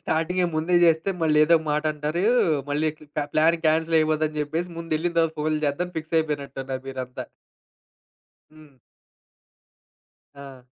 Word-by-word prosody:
స్టార్టింగే 175 Hz, +3 st, 0 dB
ముందే 160 Hz, +3 st, 0 dB
జేస్తే 165 Hz, +3 st, +3 dB
మళ్ళీ 155 Hz, -1 st, +3 dB
ఏదోక 160 Hz, 0 st, +4 dB
మాటంటారు. 150 Hz, +2 st, -1 dB, 0.5 s
మళ్ళీ 150 Hz, +2 st, +1 dB
క్ -, -, -33 dB
క్ 150 Hz, -, -16 dB
కా 150 Hz, -, 0 dB
ప్లానింగ్ 165 Hz, +1 st, +2 dB
కాన్సెల్ 160 Hz, +1 st, +2 dB
అయిపోద్దని 155 Hz, 0 st, 0 dB
జెప్పేసి 165 Hz, +4 st, -3 dB
ముందెళ్ళిన 165 Hz, +1 st, -2 dB
తర్వాత 165 Hz, -1 st, +2 dB
ఫోనులు 155 Hz, 0 st, -1 dB
జేద్దామని 180 Hz, +5 st, -2 dB
ఫిక్స్ 160 Hz, +1 st, -3 dB
అయిపోయినట్టున్నారు 140 Hz, -4 st, -4 dB
మీరంతా. 130 Hz, -1 st, -6 dB, 1.3 s
హ్మ్. 155 Hz, -3 st, -18 dB, 1.6 s
ఆ! 135 Hz, -3 st, -12 dB
155 Hz, 130 wpm, -24 LUFS, 150-165 Hz, 1.6 s, ఏదోక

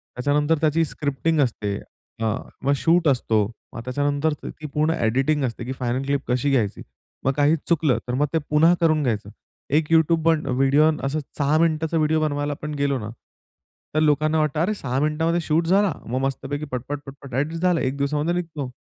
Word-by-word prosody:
त्याच्यानंतर 145 Hz, +5 st, +1 dB
त्याची 160 Hz, +1 st, +3 dB
स्क्रिप्टिंग 150 Hz, +2 st, -1 dB
असते, 105 Hz, -6 st, -1 dB, 0.5 s
अ, -, -, +1 dB, 0.4 s
मग 140 Hz, +1 st, +3 dB
शूट 165 Hz, -1 st, +3 dB
असतो, 115 Hz, -5 st, +2 dB, 0.3 s
मग 115 Hz, -, -6 dB
त्याच्यानंतर 145 Hz, +3 st, 0 dB
त -, -, -5 dB
ती -, -, -6 dB
पूर्ण 155 Hz, +2 st, +2 dB
एडिटिंग 135 Hz, +6 st, +1 dB
असते 120 Hz, 0 st, -4 dB
की 130 Hz, -, -4 dB
फायनल 125 Hz, +2 st, -1 dB
क्लिप 140 Hz, 0 st, 0 dB
कशी 125 Hz, +3 st, +1 dB
घ्यायची. 110 Hz, -7 st, 0 dB, 0.4 s
मग 135 Hz, -, +4 dB
काही 145 Hz, +3 st, +4 dB
चुकलं 155 Hz, -7 st, +2 dB
तर 125 Hz, -, -2 dB
मग 140 Hz, +4 st, +2 dB
ते -, -, +3 dB
पुन्हा 160 Hz, +3 st, +5 dB
करून 155 Hz, -2 st, +3 dB
घ्यायचं. 105 Hz, -5 st, -1 dB, 0.4 s
एक 150 Hz, +2 st, +1 dB
YouTube 160 Hz, 0 st, +4 dB
बन 160 Hz, -2 st, +1 dB
व्हिडिओ 135 Hz, +4 st, +4 dB
अस 135 Hz, +2 st, -1 dB, 0.2 s
6 145 Hz, +1 st, +2 dB
मिनिटाचा 160 Hz, 0 st, +1 dB
व्हिडिओ 155 Hz, 0 st, +2 dB
बनवायला 145 Hz, -1 st, -1 dB
आपण 150 Hz, +1 st, -6 dB
गेलो 140 Hz, -2 st, +1 dB
ना, 105 Hz, 0 st, -6 dB, 0.9 s
तर -, -, +4 dB
लोकांना 155 Hz, +1 st, +2 dB
वाटतं, 150 Hz, 0 st, 0 dB
"अरे, 205 Hz, +5 st, +1 dB
6 135 Hz, -7 st, -2 dB
मिनिटांमध्ये 160 Hz, +3 st, +1 dB
शूट 165 Hz, +1 st, +1 dB
झाला 195 Hz, -2 st, +3 dB
मग 125 Hz, +3 st, -2 dB
मस्तपैकी 145 Hz, +2 st, -3 dB
पटपट, 130 Hz, +3 st, -4 dB
पटपट 135 Hz, -1 st, -11 dB
एडीट 155 Hz, +5 st, -1 dB
झालं 180 Hz, -2 st, +2 dB
एक 130 Hz, +1 st, -1 dB
दिवसामध्ये 150 Hz, +4 st, 0 dB
निघतो." 160 Hz, -6 st, -4 dB
145 Hz, 185 wpm, -23 LUFS, 135-160 Hz, 0.9 s, पुन्हा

